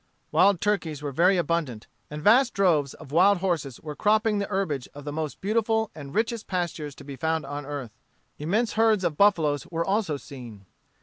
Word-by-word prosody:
Wild 195 -2 +4
turkeys 165 -8 -1
were 145 - -3
very 180 +7 +3
abundant, 155 -9 -1 0.2
and 150 0 -7
vast 240 +5 +5
droves 160 -8 +2
of 155 -4 -13
wild 190 +5 +5
horses 165 -8 -2
were 150 -2 -7
cropping 215 +2 +2
the 200 - -2
herbage 175 -10 -2
of 145 - -9
the 145 - -4
most 155 -1 -4
beautiful 220 +1 0
and 145 +1 -10
richest 225 0 -1
pastures 170 -6 -3
to - - -12
be 140 -1 -8
found 160 +2 -1
on 145 0 -6
earth. 140 -6 -5 0.5
Immense 205 +10 0
herds 220 -3 +3
of 170 -4 0
buffaloes 160 -7 +2
were 165 0 -2
also 195 -7 0
seen. 120 -8 -11
165 Hz, 185 wpm, -26 LUFS, 145-200 Hz, 0.5 s, vast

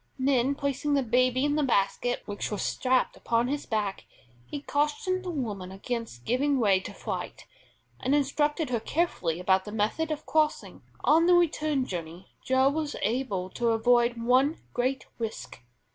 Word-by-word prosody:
Then 265 0 +2
placing 280 +1 -1
the 275 - +2
baby 255 +2 +2
in 290 0 +1
the - - +2
basket 245 -1 0
which 205 0 -4
was 210 - -3
strapped 255 0 +1
upon 235 0 0
his 290 +1 -3
back, 210 -3 -2 0.4
he 290 - -6
cautioned 370 +7 0
the 365 - -4
woman 210 - -4
against 200 - -5
giving 275 +3 +1
way 200 -5 +4
to 190 - -8
fright, - - -6 0.5
and 265 +3 +1
instructed 295 +1 0
her 235 - +1
carefully 215 - -1
about 190 +1 +2
the 210 - -8
method 220 +10 0
of 310 -1 -4
crossing. 310 -1 0 0.2
On 325 +3 +5
the 355 - +6
return 305 -5 +2
journey 175 -2 -7
Joe 260 +1 +3
was 300 0 -2
able 205 -5 -1
to 235 -1 0
avoid 240 +1 +3
one 255 +6 +3 0.2
great 255 +2 -1
risk. 220 - -5
255 Hz, 160 wpm, -28 LUFS, 220-290 Hz, 0.5 s, the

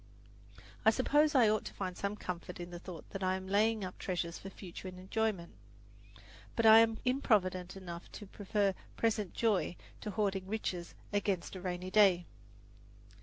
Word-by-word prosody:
I 220 - +7
suppose 295 +6 +3
I 245 -4 +7
ought 215 0 +2
to - - -7
find 185 -2 -3
some 200 +2 -2
comfort 180 -3 -6
in 175 0 -6
the 175 - -6
thought 175 -3 -9
that 195 - -5
I 185 0 +1
am 190 0 -5
laying 215 +2 +2
up 185 - -8
treasures 175 -2 -3
for 195 - -8
future 190 -1 -9
enjoyment, 185 0 -2 1.0
but 230 - +1
I 220 0 +10
am 225 -1 +4
improvident 195 -8 +1
enough 175 -2 -8
to 210 - -8
prefer 200 0 0 0.2
present 215 -4 0
joy 210 -6 +1 0.2
to 215 - -5
hoarding 195 -2 -1
riches 190 -5 -3 0.2
against 200 -3 -1
a 185 - -6
rainy 180 0 -4
day. 190 -4 +5
195 Hz, 165 wpm, -33 LUFS, 180-215 Hz, 1.0 s, I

